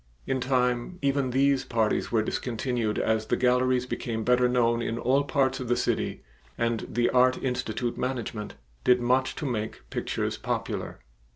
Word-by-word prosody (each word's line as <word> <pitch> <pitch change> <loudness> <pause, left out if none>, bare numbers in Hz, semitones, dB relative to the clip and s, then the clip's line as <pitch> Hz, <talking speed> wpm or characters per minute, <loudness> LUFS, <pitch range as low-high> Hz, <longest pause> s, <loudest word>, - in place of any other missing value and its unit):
In 135 - 0
time 125 +4 0
even 140 -1 +1
these 135 +1 +2
parties 115 -4 0
were 110 -2 +2
discontinued 115 -1 -2
as 110 0 0
the - - +1
galleries 125 0 +2
became 115 -3 -3
better 125 +1 +3
known 120 -1 +2
in 115 0 -2
all 130 +4 +2
parts 135 -1 +1
of 130 - -5
the 120 - +2
city - - -1 0.3
and 115 -1 -1
the 120 +2 +1
Art 125 0 +4
Institute 125 -2 -2
management 120 -4 -3 0.3
did 125 0 +5
much 130 +2 +1
to - - -5
make 110 -5 -4
pictures - - -2
popular. - - -3
125 Hz, 160 wpm, -27 LUFS, 115-130 Hz, 0.3 s, did